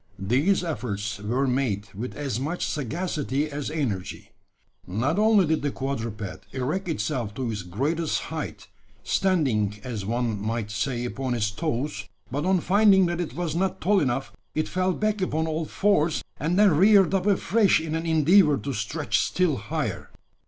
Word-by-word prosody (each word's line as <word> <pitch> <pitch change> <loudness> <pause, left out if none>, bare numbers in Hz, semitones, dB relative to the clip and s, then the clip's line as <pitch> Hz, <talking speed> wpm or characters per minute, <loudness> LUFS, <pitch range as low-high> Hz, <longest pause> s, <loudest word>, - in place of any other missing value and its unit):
These 135 - +2
efforts 105 - -3
were 120 +7 0
made 125 -6 -1
with 115 +6 -6
as 135 -6 -3
much 155 +7 -2
sagacity 150 - -2
as 145 0 -4
energy. 125 - -3 0.6
Not 130 - 0
only 215 -3 +5
did 160 0 +1
the 145 - 0
quadruped 115 - -5
erect 145 +9 -2
itself 130 -9 -2
to 125 -3 -2
its 105 -3 -4
greatest 145 - -1
height 110 -10 -5 0.4
standing, 110 - +1
as 115 -6 -4
one 115 -1 -1
might 110 0 -2
say, 120 +3 -2
upon 130 0 -2
its 105 -3 0
toes 140 +4 -3 0.2
but 145 +5 -2
on 185 -2 +3
finding 195 0 +5
that 175 0 -1
it 170 - -5
was 170 -3 -2
not 190 +2 0
tall 200 +3 +3
enough, 135 -3 -1 0.2
it 155 - 0
fell 185 0 0
back 215 +1 -1
upon 160 -3 0
all 160 0 -2
fours, 170 -4 +1 0.2
and 165 +4 0
then 205 -2 +6
reared 195 +1 +5
up 195 0 +1
afresh 205 0 +3
in 160 -1 -4
an 165 +1 -2
endeavour 160 0 +5
to 140 0 -4
stretch 130 +8 -1
still 180 -7 +1
higher. 110 -1 -3
145 Hz, 165 wpm, -25 LUFS, 115-175 Hz, 0.6 s, then